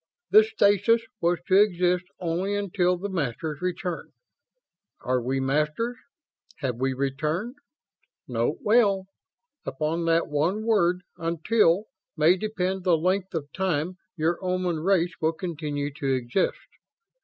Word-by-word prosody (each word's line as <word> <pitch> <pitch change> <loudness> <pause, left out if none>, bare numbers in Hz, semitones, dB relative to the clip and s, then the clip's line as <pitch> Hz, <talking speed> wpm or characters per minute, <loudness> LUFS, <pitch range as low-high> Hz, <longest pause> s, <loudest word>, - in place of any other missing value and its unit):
This 435 +1 +7
stasis 210 - +3 0.2
was 175 +1 +2
to 190 +2 +5
exist 180 -3 +2
only 180 +4 -1
until 180 -3 +1
the 195 +3 -4
Masters 155 -3 -3
returned. 180 -1 -3 0.9
Are 125 0 0
we 130 +3 -1
Masters? 150 - 0 0.6
Have 130 -4 -3
we 130 +1 0
returned? 150 - -2 0.7
Note 120 +4 -1
well: 205 -4 +3 0.6
Upon 165 +2 -2
that 165 0 +2
one 165 +8 0
word 180 -5 +2
'until' 170 +3 +2 0.3
may 155 +4 +5
depend 190 -2 -2
the 175 -3 +4
length 185 +3 -1
of 145 -3 -4
time 180 -1 -1 0.2
your 165 +3 0
Oman 180 -2 -1
race 175 0 +2
will 160 +1 +2
continue 150 -4 -4
to 140 -1 -2
exist." 125 +8 0
175 Hz, 125 wpm, -26 LUFS, 150-190 Hz, 0.9 s, This